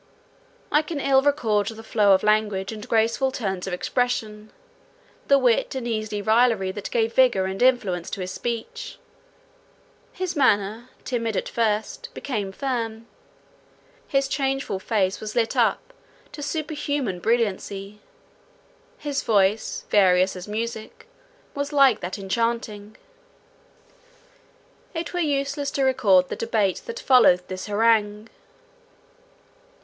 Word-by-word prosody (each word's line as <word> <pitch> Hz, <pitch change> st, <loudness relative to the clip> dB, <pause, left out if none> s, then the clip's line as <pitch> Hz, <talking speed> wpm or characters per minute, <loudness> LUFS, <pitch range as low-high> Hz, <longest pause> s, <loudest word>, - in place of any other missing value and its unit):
I 300 Hz, -, +4 dB
can 310 Hz, -1 st, -5 dB
ill 270 Hz, -1 st, +4 dB
record 225 Hz, -8 st, +1 dB
the 225 Hz, 0 st, -6 dB
flow 210 Hz, -3 st, +3 dB
of 190 Hz, -, +2 dB
language 210 Hz, -2 st, +1 dB
and 215 Hz, -1 st, -8 dB
graceful 230 Hz, +4 st, +2 dB
turns 195 Hz, -7 st, -3 dB
of 190 Hz, -, -3 dB
expression, 215 Hz, 0 st, -2 dB, 0.8 s
the 280 Hz, -, +6 dB
wit 250 Hz, -1 st, +2 dB
and 255 Hz, -2 st, -3 dB
easy 215 Hz, -2 st, -3 dB
raillery 220 Hz, -3 st, +3 dB
that 200 Hz, +1 st, -6 dB
gave 230 Hz, -1 st, 0 dB
vigour 245 Hz, -8 st, +4 dB
and 190 Hz, +2 st, -4 dB
influence 205 Hz, -9 st, +2 dB
to 195 Hz, -, -5 dB
his 185 Hz, 0 st, -4 dB
speech. 230 Hz, +2 st, -5 dB, 1.1 s
His 370 Hz, -2 st, -4 dB
manner, 225 Hz, -3 st, +1 dB
timid 230 Hz, -4 st, -2 dB
at -, -, -2 dB
first, 225 Hz, -, -1 dB
became 210 Hz, -8 st, -3 dB
firm—his 250 Hz, -, -5 dB
changeful 270 Hz, -6 st, -1 dB
face 195 Hz, -2 st, 0 dB
was 215 Hz, +1 st, -6 dB
lit 230 Hz, -2 st, +1 dB
up -, -, +1 dB, 0.4 s
to 295 Hz, -, -9 dB
superhuman 290 Hz, -, -3 dB
brilliancy; 205 Hz, -2 st, -1 dB, 1.0 s
his 285 Hz, -2 st, -3 dB
voice, 205 Hz, 0 st, +1 dB
various 185 Hz, -2 st, +4 dB
as 180 Hz, +1 st, -8 dB
music, 220 Hz, +1 st, -5 dB, 0.5 s
was 285 Hz, +1 st, -3 dB
like 275 Hz, -6 st, +5 dB
that 180 Hz, +3 st, -5 dB
enchanting. 215 Hz, 0 st, -3 dB, 2.0 s
It 330 Hz, +2 st, -4 dB
were 355 Hz, -, -1 dB
useless 285 Hz, -2 st, -1 dB
to 275 Hz, -, -1 dB
record 205 Hz, -9 st, +3 dB
the -, -, -3 dB
debate 220 Hz, -4 st, 0 dB
that 470 Hz, +1 st, -5 dB
followed 235 Hz, -, +4 dB
this 185 Hz, +1 st, -6 dB
harangue. 210 Hz, 0 st, +1 dB
225 Hz, 125 wpm, -24 LUFS, 205-265 Hz, 2.0 s, the